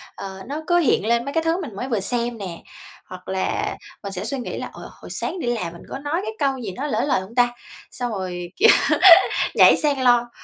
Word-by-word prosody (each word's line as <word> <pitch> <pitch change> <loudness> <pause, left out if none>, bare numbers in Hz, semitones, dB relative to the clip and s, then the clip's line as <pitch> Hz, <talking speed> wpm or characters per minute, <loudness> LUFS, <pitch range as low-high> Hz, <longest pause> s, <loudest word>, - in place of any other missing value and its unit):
ờ, 190 0 -8
nó 300 +3 -4
cứ 350 -1 +3
hiện 265 - +2
lên 235 0 +1
mấy 280 - -5
cái 325 - +1
thứ 330 +3 0
mình 255 - -7
mới 250 +6 -4
vừa 225 -4 0
xem 235 +3 -1
nè, 180 -5 -7 0.5
hoặc 185 0 -11
là 190 0 -2 0.3
mình 200 - -5
sẽ 180 - -4
suy 275 - -3
nghĩ 245 - -5
là, - - -5
"Ờ, - - -10
hồi - - -11
sáng 370 - -4
đi 245 - -4
làm 180 -8 -2
mình 170 - -12
có - - -6
nói 295 +5 -2
cái 440 - -4
câu 275 -2 +1
gì 225 -6 -5
nó 265 +10 -4
lỡ - - 0
lời 275 -9 +1
hông 195 +5 -12
ta?" 245 -1 +3 0.4
Xong 245 -2 -4
rồi, 180 -3 -5
kiểu, 450 +3 +5 0.9
nhảy - - +7
sang 285 -3 +1
lo, 240 -1 +3
240 Hz, 240 wpm, -22 LUFS, 195-285 Hz, 0.9 s, nhảy